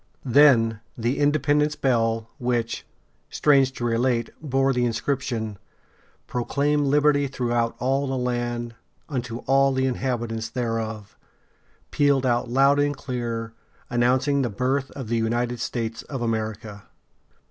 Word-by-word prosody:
Then 120 -4 +5 0.2
the 120 +3 -1
Independence 145 0 +2
Bell, 115 -3 +1
which, 120 -2 -2 0.4
strange 135 -3 +3
to 120 - -6
relate, 120 0 +1
bore 135 -2 +1
the 125 -1 +1
inscription, 115 -3 -2 0.7
"Proclaim 145 +4 0
liberty 145 0 +3
throughout 120 -3 -1
all 135 +2 0
the 135 0 -2
land 120 -1 -2 0.3
unto 125 -4 -4
all 135 0 +4
the 130 0 +1
inhabitants 120 -3 -2
thereof," 115 -4 -3 0.8
pealed 140 -2 +2
out 120 -1 +1
loud 135 +3 +4
and 145 -1 +1
clear, 115 -4 -4 0.4
announcing 130 +3 +2
the 125 - 0
birth 130 +5 -1
of 130 -5 -6
the 115 +1 0
United 120 +2 -1
States 115 -1 -3
of 135 -4 -5
America! 110 -2 -3
125 Hz, 125 wpm, -24 LUFS, 115-135 Hz, 0.8 s, Then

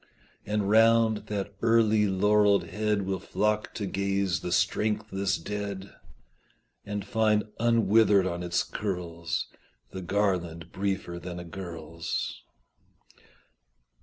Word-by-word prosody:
And 105 -1 0
round 110 0 +4
that 100 -1 -3
early 110 -2 +4
laurelled 105 +1 +3
head 105 +4 -1
Will 95 0 -2
flock 105 +4 -1
to 105 - -3
gaze 100 -1 0
the 90 - -5
strengthless 100 +1 0
dead, 100 +1 -5 0.9
And 105 -1 -4
find 105 0 +2 0.2
unwithered 110 -3 +4
on 90 -1 -2
its 85 -1 0
curls 85 -4 -3 0.5
The 95 - -6
garland 90 -4 -1
briefer 95 -3 -3
than 90 0 -7
a - - -6
girl's. 85 -2 -5
100 Hz, 105 wpm, -28 LUFS, 90-105 Hz, 0.9 s, round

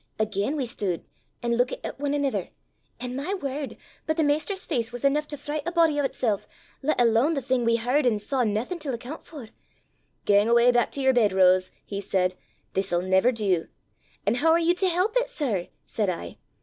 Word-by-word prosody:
Again 215 +5 -1
we 275 -4 -1
stood 205 -8 -3 0.4
an' 235 - 0
luikit 245 +2 +1
at - - -5
ane 285 0 +1
anither; 280 -2 -1 0.5
an' 250 0 -5
my 295 +9 -2
word! 280 -4 -4 0.3
but 315 +1 0
the 320 - +3
maister's 310 +7 0
face 230 -1 -1
was 245 0 -8
eneuch 295 +2 +2
to 295 - -6
fricht 295 +2 -4
a - - 0
body 330 -4 +3
o' 275 - +2
'tsel', 220 -7 -1 0.4
lat 300 0 0
alane 240 +7 +3
the - - 0
thing 255 -1 0
we 230 0 +3
h'ard 250 +4 +1
an' 225 -3 +2
saw 250 +5 -1
naething 225 - -1
til 275 -5 -3
accoont 255 +7 -8
for! 280 -9 -10 0.8
'Gang 205 +2 +4
awa' 235 +1 +6
back 240 0 +3
to 280 - -2
yer 265 0 +4
bed, 220 -5 +3
Rose,' 185 -1 +4 0.2
he 200 -1 -4
said; 185 -2 0 0.4
'this'll 185 -2 0
never 190 +6 +3
do!' 195 -8 0 0.6
'An' - - +3
hoo 275 +7 0
are 325 +1 +6
ye 340 +1 +3
to 370 +1 +1
help 365 +5 +1
it, - - +1
sir?' 245 - -2 0.2
said 210 -4 -1
I. 85 - -5
250 Hz, 205 wpm, -26 LUFS, 210-295 Hz, 0.8 s, awa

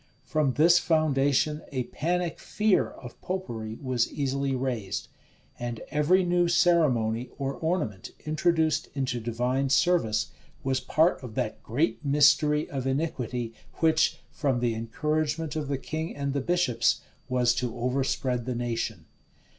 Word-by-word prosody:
From 150 -4 +1
this 170 +5 +6
foundation 150 -1 +2
a 130 -3 -1
panic 175 +6 -2
fear 215 -2 +1
of 120 -2 -12
Popery 115 -13 -4
was 130 -3 0
easily 140 -1 -1
raised; 125 -7 -3 0.5
and 120 -1 -4
every 165 +6 +3
new 175 0 +2
ceremony 140 -10 +2
or 135 -1 -2
ornament 155 - -2 0.2
introduced 155 0 +1
into 130 -3 -1
divine 125 +4 -1
service, 130 -6 +2 0.3
was 130 -1 +1
part 160 +6 +2
of 120 -4 -9
that 110 - -2
great 150 +7 -1
mystery 150 +1 +4
of 135 -2 -3
iniquity, 125 -5 -2 0.2
which, 160 -1 +3
from 135 -4 0
the 120 -1 +1
encouragement 150 +7 -2
of 155 -2 -2
the 140 -1 -1
king 160 +4 -4
and 140 -1 -2
the 140 - 0
bishops, 155 -8 +1 0.3
was 125 -1 +3
to 125 -1 -3
overspread 125 0 -1
the 125 - -1
nation. 115 -7 -3
140 Hz, 135 wpm, -27 LUFS, 120-155 Hz, 0.5 s, this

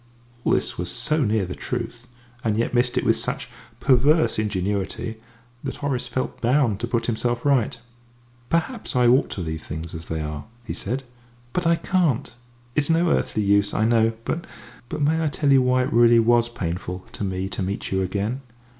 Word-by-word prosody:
All - - +2
this - - 0
was 90 0 -1
so 155 - +2
near 105 -3 +1
the 90 - -5
truth, 120 +1 -5 0.4
and 110 -2 +1
yet 115 - 0
missed 120 0 +2
it - - +2
with - - +4
such - - -3 0.3
perverse 135 +4 +4
ingenuity, 105 +1 -2 0.5
that 135 -2 -3
Horace 140 -3 -2
felt 130 - -3
bound 120 -4 +2
to 120 - -2
put 115 0 0
himself 120 +1 -1
right. 130 -5 +2 0.7
"Perhaps 170 - -1
I 125 -1 +4
ought 125 +3 +4
to 95 - -4
leave 80 -1 -4
things 80 +2 -6
as 80 0 -6
they 80 -1 -3
are," 75 -1 -5 0.2
he 115 - -5
said, 125 +7 -2 0.5
"but 180 -1 0
I 170 - +5
can't. 165 -9 0 0.4
It's 145 +3 +1
no 165 +1 +3
earthly 105 - +1
use, 100 0 +3
I 110 - +2
know; 115 -1 +3
but 170 - -1 0.6
may 160 +3 +2
I - - +2
tell 145 -1 +1
you 135 - +6
why 125 0 +3
it 135 - -3
really 120 0 +6
was 120 +1 +4
painful 90 -2 -4
to - - -6
me 95 -1 -2
to 100 - -4
meet 95 +2 -3
you 95 0 +1
again? 100 +7 -2
120 Hz, 190 wpm, -24 LUFS, 100-135 Hz, 0.7 s, you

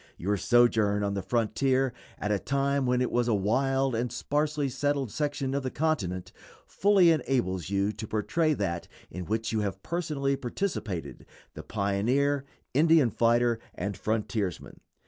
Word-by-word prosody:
Your 100 +4 0
sojourn 110 -2 +3
on 100 0 0
the 100 - -2
frontier 120 +6 +1 0.2
at 105 - -2
a 100 - +1
time 140 +1 0
when 125 0 +2
it 125 - 0
was 120 0 +1
a 115 - +3
wild 135 +6 +1
and 120 +2 -1
sparsely 150 0 -1
settled 140 -2 -1
section 145 -1 -2
of 140 - 0
the 130 - -3
continent 105 - -1 0.3
fully 195 -4 +4
enables 120 - 0
you 100 +1 +1
to 105 +1 -7
portray 155 +10 +1
that 85 -6 -2 0.2
in 90 +1 -6
which 110 +3 -2
you 110 - 0
have 100 -2 -3
personally 150 -5 -1
participated 115 - -4 0.3
the - - -7
pioneer, 130 +9 0 0.3
Indian 155 -3 +4
fighter, 120 +1 +2 0.2
and 100 +2 -3
frontiersman. 105 -4 -3
120 Hz, 150 wpm, -28 LUFS, 100-140 Hz, 0.3 s, fully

